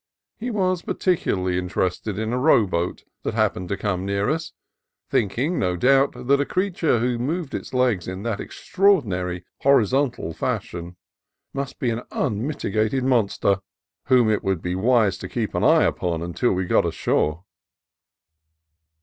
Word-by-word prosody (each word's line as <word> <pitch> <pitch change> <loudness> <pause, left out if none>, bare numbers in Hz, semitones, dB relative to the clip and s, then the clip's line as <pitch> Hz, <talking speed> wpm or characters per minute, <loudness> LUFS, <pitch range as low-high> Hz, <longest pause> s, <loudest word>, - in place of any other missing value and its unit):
He 240 +3 -3
was 185 -5 0
particularly 95 - 0
interested 90 +2 -2
in 110 +2 -2
a 125 - 0
row 125 -5 +5
boat 90 -1 -2 0.2
that - - -3
happened 105 -5 0
to 100 - -1
come 95 -3 -2
near 100 +5 0
us, 160 +1 -3 0.6
thinking, 130 - 0
no 90 -1 0
doubt, 135 +6 +4
that 140 +2 +3
a - - +3
creature 180 -8 0
who 120 +1 0
moved 150 +4 -2
his - - -5
legs 125 -8 +1
in 95 +2 -5
that 115 -3 -2
extraordinary 100 - 0
horizontal 130 - +2
fashion 85 +2 -4 0.6
must 140 -1 -4
be 120 - 0
an 115 +1 -3
unmit 130 +3 -2
igated 110 +6 0
monster, 105 -6 +2 0.5
whom 125 -4 +4
it 110 -1 +1
would 95 -4 -1
be 90 - -2
wise 110 -2 +2
to - - -7
keep - - -2
an - - -1
eye - - +5
upon 85 -2 -1
until 85 +8 0
we 95 0 0
got - - +3
ashore. 75 +4 0
110 Hz, 155 wpm, -23 LUFS, 95-135 Hz, 0.6 s, row